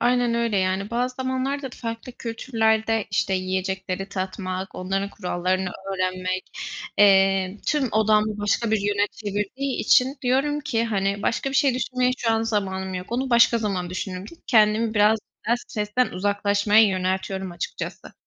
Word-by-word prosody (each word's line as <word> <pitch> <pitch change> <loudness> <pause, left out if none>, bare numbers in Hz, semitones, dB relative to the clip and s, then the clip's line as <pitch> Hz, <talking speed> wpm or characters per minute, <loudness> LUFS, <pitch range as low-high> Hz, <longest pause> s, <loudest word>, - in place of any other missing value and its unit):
Aynen 245 -1 +2
öyle. 235 -3 0
Yani, 190 +2 0
bazı 250 +2 -1
zamanlar 260 +2 -2
da 270 - -4
farklı 230 +1 -6
kültürlerde, 225 -2 0
işte, 190 - +1
yiyecekleri 190 +1 -2
tatmak, 185 -1 -4
onların 195 +2 -2
kurallarını 185 +1 -1 0.2
öğrenmek, 185 0 -2 0.5
eee, 195 -1 +4
tüm 290 -4 +1
odağımı 215 0 +2
başka 205 +2 0
bir 220 - +2
yöne 205 0 +1
çevirdiği 210 +6 -3
için 260 +3 +4
diyorum 275 +4 +1
ki, 230 -5 0
"Hani, 200 -2 -1
başka 270 +3 0
bir 270 - -6
şey 270 -1 +3
düşünmeye 255 0 0
şu 230 - 0
an 225 0 +1
zamanım 190 -4 -2
yok. 180 0 -5
Onu 260 +2 -1
başka 235 0 +5
zaman 190 -5 -2
düşünürüm." 185 0 -4 0.2
Kendimi 220 0 +3
biraz 210 +1 +4 0.3
daha 235 +2 +3
stresten 220 +1 -1
uzaklaşmaya 205 +2 +3
yöneltiyorum 190 0 -2
açıkçası. 175 - -6
210 Hz, 145 wpm, -24 LUFS, 190-235 Hz, 0.5 s, başka